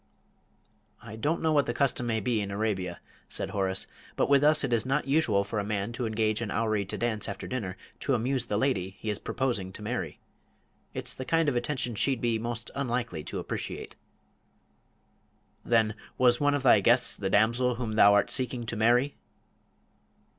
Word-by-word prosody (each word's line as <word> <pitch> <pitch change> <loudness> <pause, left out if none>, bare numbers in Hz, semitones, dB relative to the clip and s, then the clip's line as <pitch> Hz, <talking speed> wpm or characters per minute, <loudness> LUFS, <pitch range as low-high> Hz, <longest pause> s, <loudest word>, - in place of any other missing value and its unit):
"I 110 - -8
don't 150 +10 -1
know 160 -1 +2
what 145 -2 +3
the 120 - -2
custom 130 -2 +1
may 110 -1 +1
be 115 0 0
in 100 - -4
Arabia," 100 -4 -2 0.3
said - - -3
Horace, 95 -1 +1 0.3
"but - - +1
with 140 0 +5
us 150 +1 +6
it 130 -3 0
is 115 -2 +2
not 135 +2 -1
usual 135 -9 +2
for 105 +2 -3
a - - -1
man 100 +1 -2
to 120 0 -3
engage 110 0 0
a 115 - -2
houri 110 -2 0
to 95 - -4
dance 115 -3 0
after 100 - -6
dinner 100 -7 -4 0.2
to 135 - +1
amuse 125 +1 -1
the 105 - 0
lady 95 -7 0
he 110 - -3
is 105 - -3
proposing 120 -8 -2
to 105 - -7
marry. 120 +3 -4 0.8
It's - - -3
the 130 - -6
kind 165 +3 +1
of 140 - +1
attention 120 0 -1
she'd 130 +4 +1
be 115 -2 0
most 120 +1 -5
unlikely 120 - -2
to - - -4
appreciate. - - -5 1.7
"Then 110 -2 +2 0.2
was 125 -1 +4
one 145 0 +3
of 140 - -2
thy 120 -5 +6
guests 120 +5 +3
the 95 - -3
damsel 115 +5 +2
whom 115 -2 -3
thou 100 -1 +6
art 100 - +2
seeking 125 -2 -1
to 115 - -2
marry?" 120 +6 +2
115 Hz, 190 wpm, -28 LUFS, 105-130 Hz, 1.7 s, us